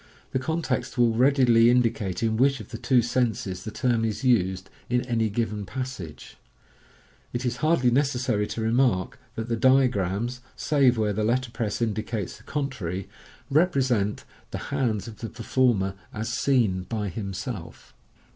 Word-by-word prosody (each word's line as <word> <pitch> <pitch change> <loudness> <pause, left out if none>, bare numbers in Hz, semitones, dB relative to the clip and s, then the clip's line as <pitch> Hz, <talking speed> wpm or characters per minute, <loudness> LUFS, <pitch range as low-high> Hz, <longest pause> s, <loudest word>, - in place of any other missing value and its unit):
The 130 - 0
con 160 +5 -2
text 130 -3 -2
will 120 -1 +4
readily 120 -2 +5
indicate 115 -6 +1
in 110 -1 +1
which 135 +3 +3
of - - -10
the 115 - -7
two 125 -3 +3
senses 110 -6 -1
the - - -5
term 115 +1 0
is 110 0 -2
used 95 -7 +2 0.2
in 125 0 +2
any 115 -3 +1
given 105 -1 -2
passage. 125 - -7 1.0
It 120 +1 -2
is 125 0 -1
hardly 140 -3 +3
necessary 125 -6 +1
to 115 - -4
remark 115 -3 +1 0.2
that 115 0 -4
the 115 - 0
diagrams, 120 -2 +2
save 135 -5 +3
where 105 -2 +1
the 110 +2 -1
letterpress 115 -2 -1
inctW 110 -1 -1
cates 105 -6 -4
the 110 - -19
contrary, 100 - -3 0.4
represent 130 - +2 0.3
the - - -6
hands 120 -6 0
of 110 -2 -10
the 115 - -5
performer 115 -5 +1 0.2
as 110 0 -4
sun 110 -7 +1
by 105 -3 -2
himself. 100 - -6
115 Hz, 155 wpm, -26 LUFS, 105-130 Hz, 1.0 s, readily